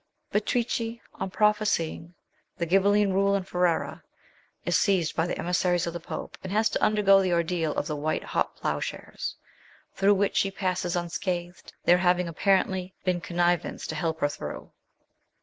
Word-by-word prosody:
Beatrice, 230 +1 0 0.2
on 190 - -4
prophesying 205 -5 0 0.4
the 170 - -1
Grhibelline 195 +3 +3
rule 200 +1 +3
in 195 - 0
Ferrara, 180 -2 0 0.6
is - - +1
seized 185 -6 +2
by 160 - +1
the - - -3
emissaries 175 0 +1
of 170 - -4
the 175 - -4
Pope, 160 - -7
and 190 - -5
has 215 +2 +3
to - - -1
undergo 200 -2 +5
the 185 -1 0
ordeal 170 -2 0
of - - -1
the 150 - -3
white 155 +2 -1
hot - - -1
ploughshares, - - -4 0.6
through 200 +1 +4
which 200 +1 +1
she 195 - +3
passes 185 -2 -2
unscathed, 175 0 -3
there 175 +1 +5
having 180 -1 +2
apparently 190 +1 +1
been 180 -2 +1
connivance 175 0 0
to - - -4
help 160 -2 -2
her 145 - +3
through. - - -7
180 Hz, 160 wpm, -27 LUFS, 170-195 Hz, 0.6 s, undergo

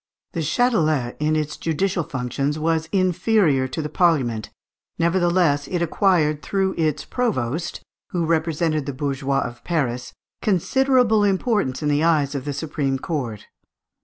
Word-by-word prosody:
The - - -4
Châtelet, 155 - +1
in 155 +1 +1
its 150 -1 -2
judicial 170 +2 -1
functions, 135 +2 -2
was 160 0 0
inferior 185 -6 +2
to 155 +4 -4
the - - -2
Parliament, 140 -10 +1 0.5
nevertheless 170 -4 +2
it 175 -2 -1
acquired, 160 -4 +2
through 190 -1 0
its 155 -3 -1
provost, 170 - -2 0.3
who 175 -2 -1
represented 160 -2 0
the 140 - -2
bourgeois 135 0 -1
of 120 0 -6
Paris, 125 -7 -2 0.3
considerable 235 - +3
importance 195 - 0
in 150 - +1
the 145 +1 +2
eyes 150 -4 +2
of 140 -2 -4
the 145 - -2
supreme 140 -2 -2
court. 130 -8 -4
155 Hz, 135 wpm, -22 LUFS, 140-180 Hz, 0.5 s, considerable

